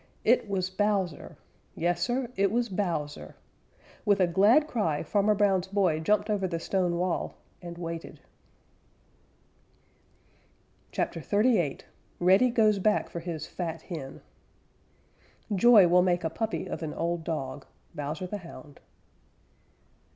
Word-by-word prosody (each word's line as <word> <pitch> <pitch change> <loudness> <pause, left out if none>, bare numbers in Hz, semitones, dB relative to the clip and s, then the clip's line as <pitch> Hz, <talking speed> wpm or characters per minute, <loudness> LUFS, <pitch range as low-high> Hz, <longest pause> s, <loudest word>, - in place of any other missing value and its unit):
It 230 -2 +3
was 185 -2 -1
Bowser! 195 -5 -1 0.4
Yes, 175 +1 0
Sir, 245 +6 -1
it 195 0 +2
was 240 +1 0
Bowser! 170 -7 -3 0.7
With 205 -2 +3
a 185 - +5
glad 205 - +4
cry 185 - -1
Farmer 210 +1 +2
Brown's 195 -3 +2
boy 190 -5 +1
jumped 210 +6 +1
over 205 -3 0
the 170 -2 -3
stone 175 -1 0
wall 180 0 -2 0.3
and 170 -1 -8
waited. 165 -1 -6 2.7
CHAPTER - - -2
XXXVIII 205 - +1 0.4
REDDY 190 +8 +5
GOES 215 -4 +3
BACK 210 +2 +1
FOR 170 - -4
HIS 165 -2 -5
FAT 165 -3 -5
HEN 155 -7 -7 1.3
Joy 210 -1 +7
will 180 +1 +5
make 180 -1 +1
a 160 - -1
puppy 220 +5 -3
of - - -5
an 155 -2 -4
old 170 0 -2
dog. 140 -4 -4 0.3
_Bowser 150 +5 -4
the 205 +3 -5
Hound. 155 -5 -12
185 Hz, 130 wpm, -28 LUFS, 165-205 Hz, 2.7 s, Joy